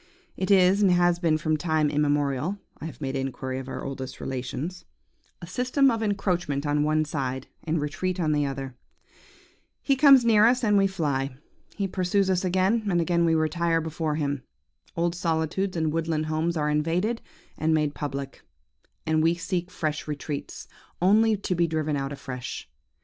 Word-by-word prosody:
It 190 - -3
is, 190 0 +5
and 200 - +5
has 175 -1 +3
been 165 -3 +2
from 155 0 0
time 155 -1 +1
immemorial 145 +3 0 0.2
(I - - -7
have 150 -5 -8
made 135 -1 -3
inquiry 130 0 -3
of 135 0 -8
our - - -5
oldest 135 -1 -6
relations), 130 +7 -4 0.6
a - - -4
system 255 - +2
of 225 - -2
encroachment 180 -8 -1
on 145 0 +1
one 155 +1 +2
side, 130 -4 -3 0.2
and 160 +1 0
retreat 175 +5 -2
on 155 -3 +1
the 150 -1 +2
other. 135 -2 -4 1.1
He 275 - +3
comes 270 -3 +7
near 220 -1 +6
us 245 +1 +2
and 210 -2 +3
we 195 -1 +4
fly; 140 -8 -2 0.4
he 200 -2 -1
pursues 190 +1 +1
us 185 0 +1
again, 190 +4 +1
and 175 -2 +2
again 170 0 +2
we 165 -1 +3
retire 165 +1 +1
before 160 -1 -2
him. 145 -3 -1 0.5
Old 170 0 0
solitudes 170 +2 -1
and 160 -2 0
woodland 160 -1 -1
homes 160 +2 -1
are 150 -1 0
invaded, 170 +10 0 0.3
and 160 +1 0
made 150 -2 +1
public; 140 -2 -5 0.6
and 155 0 +2
we 165 +2 +3
seek 175 +1 -3
fresh 155 -5 -3
retreats, 145 -1 -5 0.3
only 215 +4 +4
to 195 -1 -2
be 170 -1 +2
driven 155 -2 -1
out 135 0 -2
afresh. 125 -3 -6
160 Hz, 170 wpm, -26 LUFS, 145-185 Hz, 1.1 s, comes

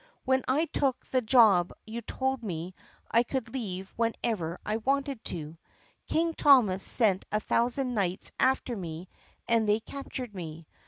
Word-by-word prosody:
When 260 0 +3
I 290 +6 +2
took 275 -4 -1
the 255 - +1
job 215 -7 +5
you 225 +2 -5
told 265 +3 -2
me 175 -2 -4 0.4
I 230 - +5
could 255 +1 -3
leave 195 -7 -5
whenever 220 -7 -1
I 215 +1 0
wanted 275 +1 -1
to. 160 -1 -6 0.5
King 330 +1 +1
Thomas 245 -12 +5
sent 200 -5 +2
a 210 - +2
thousand 245 +4 0
knights 190 -4 -1
after 260 -2 +2
me 175 -2 -6 0.4
and 230 -2 +2
they 210 +1 +4
captured 255 -2 -7
me. 165 -3 -7
225 Hz, 150 wpm, -29 LUFS, 185-260 Hz, 0.5 s, job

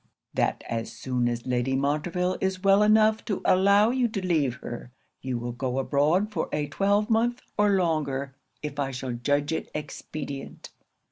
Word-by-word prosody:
'"That - - 0
as 115 -1 -3
soon 125 -2 -1
as 120 0 -4
Lady 125 +1 0
Montreville 160 +6 0
is 190 0 -1
well 195 +1 +5
enough 215 +1 +4
to 200 - -1
allow 200 +4 +5
you 255 -1 +2
to 195 -4 -4
leave 150 -8 +1
her, 120 -1 -8 0.3
you 130 -2 -2
will 120 +1 -4
go 125 +1 -3
abroad 150 +10 +2
for 175 -6 -2
a 150 0 0
twelvemonth 215 - +1
or 205 -1 +3
longer 140 -6 -1 0.3
if 145 -1 -5
I 140 -1 0
shall 130 -1 -4
judge 145 +5 0
it - - -3
expedient." 145 -1 -6
150 Hz, 160 wpm, -26 LUFS, 135-195 Hz, 0.3 s, well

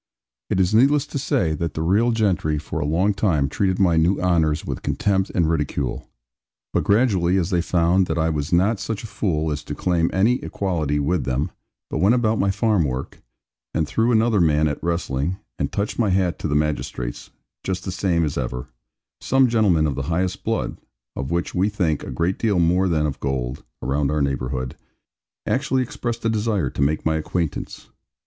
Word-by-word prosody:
It - - +1
is 95 +2 +2
needless 140 +5 +4
to 145 - -4
say 85 - +1
that 80 0 -3
the 80 - -1
real 105 +8 +3
gentry 95 -9 +1
for 75 - -4
a - - -1
long 90 +7 +2
time 90 -9 +1
treated 95 +5 0
my 85 -4 +3
new 85 +4 +3
honours 80 -4 +1
with - - -4
contempt 95 -1 0
and 85 -3 +3
ridicule; 75 -5 -2 0.6
but - - +1
gradually 100 -5 +3
as 90 +1 0
they 90 -2 +2
found 90 +2 +2
that 80 - -2
I 80 0 +1
was 75 -2 -3
not 95 +5 +3
such 110 +1 -4
a - - -5
fool 90 -7 -1
as 75 0 -3
to - - -6
claim 85 -2 +1
any 115 +7 +2
equality 80 -7 -1
with 75 +4 0
them, 65 +3 -1 0.4
but - - -3
went 105 +6 +4
about 115 -3 +1
my 100 +1 +2
farm 100 -1 +2
work, 65 -2 -4 0.5
and 80 -2 +1
threw 115 +9 +1
another 110 -3 +3
man 75 -1 +3
at 75 0 -4
wrestling, 85 -1 -1 0.2
and - - -1
touched 100 +3 -2
my 110 -4 +3
hat 90 -2 +1
to - - -2
the 75 - -1
magistrates, 75 -5 -2 0.3
just 95 -1 -3
the 95 - -3
same 85 -3 +1
as 70 -1 -2
ever; 60 -1 -4 0.5
some 135 0 +3
gentlemen 105 -9 +3
of 75 - 0
the 70 - -3
highest 90 +2 -1
blood - - -2 0.4
of 65 - -4
which 85 +1 -1
we 95 +3 +2
think 90 -8 0
a - - -7
great 85 +3 -1
deal 105 -5 +1
more 90 +2 +3
than 80 -2 +1
of 70 -3 -3
gold, 65 0 -3 0.2
around 70 +2 0
our 75 0 +1
neighbourhood 65 -1 -2 0.7
actually 130 -1 +1
expressed 120 -3 -4
a - - +3
desire 105 - 0
to - - -4
make 75 +3 +1
my 80 0 +2
acquaintance. 80 +1 -4
85 Hz, 195 wpm, -22 LUFS, 75-100 Hz, 0.7 s, needless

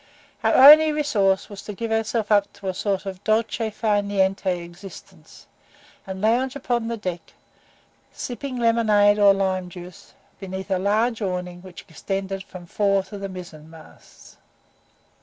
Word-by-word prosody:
Our - - +3
only 305 +4 +9
resource 215 -11 +1
was 200 -2 -10
to 210 - -8
give 230 +2 -4
ourselves 225 0 -1
up 205 -1 +3
to 195 - -9
a 185 - -1
sort 195 +1 -2
of 190 0 -7
DOLCE 220 0 0
FAR 210 -1 0
NIENTE 195 -1 -1 0.2
existence, 175 +3 -14 0.6
and 190 0 -6
lounge 240 +6 +1
upon 240 -4 -2
the 230 0 -3
deck, 180 -5 -6 0.8
sipping 255 +1 -6
lemonade 215 -3 +3
or 200 -1 +7
lime 190 -2 -1
juice, 180 0 -12 0.2
beneath 190 0 -7
a 190 - +1
large 220 +4 0
awning 180 -2 -4
which 185 -1 -12
extended 195 +3 -4
from 185 -2 -11
the - - -25
fore 195 -2 +1
to 200 +1 -10
the 195 0 -5
mizen 170 -4 -10
masts. 160 -1 -17
200 Hz, 155 wpm, -23 LUFS, 190-225 Hz, 0.8 s, only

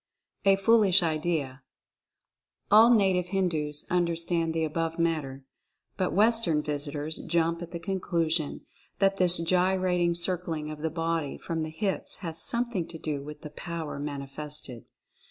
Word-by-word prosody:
A 195 0 +6
FOOLISH 195 -2 +4
IDEA. 155 -4 -1 1.1
All 220 +3 +8
native 190 -5 +3
Hindus 160 -6 -1
understand 170 -1 +1
the 160 0 -1
above 165 +1 -2
matter, 155 -5 -1 0.5
but 185 -2 -1
Western 210 -7 +3
visitors 145 +1 -3
jump 170 0 0
at 175 - -6
the 170 - -5
conclusion 170 -4 -1 0.4
that 195 0 +2
this 180 -2 +6
gyrating 180 0 +1
circling 170 -3 -2
of 150 -1 -8
the 160 - 0
body 165 -2 -2
from 165 -1 -4
the 155 - -3
hips 190 +5 -2
has 165 0 -1
some 240 0 -1
thing 180 -7 -2
to 165 - -9
do 150 -3 -3
with 150 +1 -9
the 150 - -9
"power" 165 -3 -5
manifested. 140 -3 -6
165 Hz, 140 wpm, -28 LUFS, 155-185 Hz, 1.1 s, All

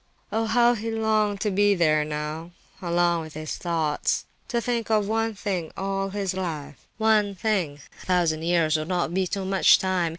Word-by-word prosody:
Oh! 225 0 0
how 240 +2 +4
he 225 -1 -4
longed 215 -2 0
to 210 - 0
be 205 +1 +3
there 155 -4 +3
now—alone 170 +3 -2
with 155 -1 -10
his 155 0 -4
thoughts—to 165 - -2
think 235 -1 -2
of 210 -2 +2
one 225 0 0
thing 190 -5 -3
all 195 0 -2
his 195 -1 -2
life—one 190 - -1
thing! 180 -8 -1 0.2
A - - -13
thousand 170 -4 +2
years 165 -2 +2
would 155 0 -4
not 175 -2 -1
be 190 0 +1
too 195 +1 -3
much 190 0 +5
time! 185 -3 0
185 Hz, 165 wpm, -25 LUFS, 165-210 Hz, 0.2 s, much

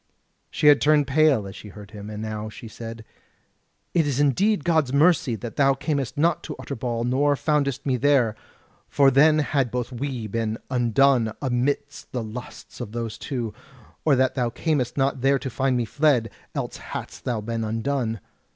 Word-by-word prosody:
She - - -3
had 145 -1 +7
turned 150 -1 +4
pale 140 -6 +3
as 95 - -9
she - - -10
heard 105 0 -12
him, 105 -1 -8
and 105 0 -6
now 110 0 -4
she 115 - -10
said: 115 0 -8 0.9
"It 165 -4 +2
is 140 -2 -1
indeed 165 - +2
God's 160 -6 +2
mercy 145 -4 +3
that 115 +1 -8
thou 135 -1 +4
camest 140 -2 -2
not 165 +2 +2
to 150 - -5
Utterbol 120 -3 -3
nor 140 +4 +2
foundest 140 -3 0
me 130 -2 +1
there, 130 -5 +3 0.5
for 140 -1 +4
then 150 +4 +5
had 140 -4 +1
both 125 +1 -3
we 125 -2 -4
been 110 +1 -2
undone 120 -1 +3
amidst 140 +2 -2
the 125 -2 -2
lusts 115 +3 -9
of 110 -3 -6
those 115 -2 -4
two; 120 -6 -4 0.5
or 150 -3 +4
that 130 0 +2
thou 125 -3 0
camest 145 0 -1
not 135 -1 +1
there 135 +1 +4
to 130 -1 -5
find 130 0 +1
me 120 - 0
fled, 125 -1 +2 0.2
else - - -3
hadst - - -7
thou 120 -3 -1
been 115 +1 -3
undone. 115 0 -2
130 Hz, 180 wpm, -24 LUFS, 115-145 Hz, 0.9 s, had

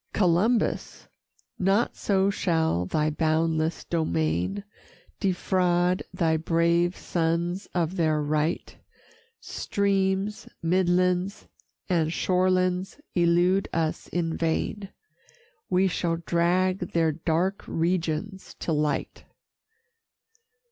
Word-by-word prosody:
Columbus! 205 +5 +1 0.5
not 195 +5 +2
so 195 -1 +1
shall 160 - 0
thy 155 +6 0
boundless 160 +1 0
domain 85 - -1 0.6
Defraud 180 -2 +1
thy 160 -2 +1
brave 170 +2 +1
sons 170 +3 -1
of 175 +1 0
their 155 -2 +2
right; 150 +2 -1 0.7
Streams, 195 0 -1
midlands, 180 +2 +1 0.4
and 165 -4 +1
shorelands 185 - +1
elude 175 +2 +3
us 160 -2 -1
in 165 -2 -2
vain. 180 +4 -2 0.8
We 185 +1 +3
shall 170 -2 -1
drag 180 +2 +1
their 165 -1 +3
dark 170 +5 -1
regions 170 +3 -2
to 165 - -1
light. 150 -1 -2
175 Hz, 85 wpm, -26 LUFS, 160-185 Hz, 0.8 s, elude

